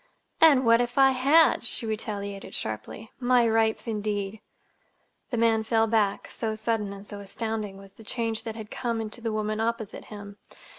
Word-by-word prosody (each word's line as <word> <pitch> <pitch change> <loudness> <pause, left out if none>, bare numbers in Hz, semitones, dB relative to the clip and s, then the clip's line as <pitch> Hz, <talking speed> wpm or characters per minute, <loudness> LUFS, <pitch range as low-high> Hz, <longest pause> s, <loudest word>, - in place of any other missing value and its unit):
"And 285 -6 +7
what 230 +1 +6
if 245 +1 -3
I 270 -1 +7
had?" 280 +6 +4
she 235 - -2
retaliated 200 -2 -4
sharply. 110 - -5
"My 245 -1 +4
rights, 225 0 +2
indeed!" 210 -2 -3 0.9
The 240 - -2
man 225 -1 +3
fell 225 0 +2
back, 215 -3 +1
so 220 -2 -3
sudden 215 -2 -1
and 200 0 -9
so 205 0 -8
astounding 210 0 -4
was 195 0 -13
the 225 - -15
change 225 0 -2
that 225 -2 -6
had 220 -2 -8
come 230 -3 -2
to 240 - -5
the 225 -1 -2
woman 215 0 -2
opposite 225 -1 -3
him. 205 -1 -10
220 Hz, 170 wpm, -27 LUFS, 210-230 Hz, 0.9 s, And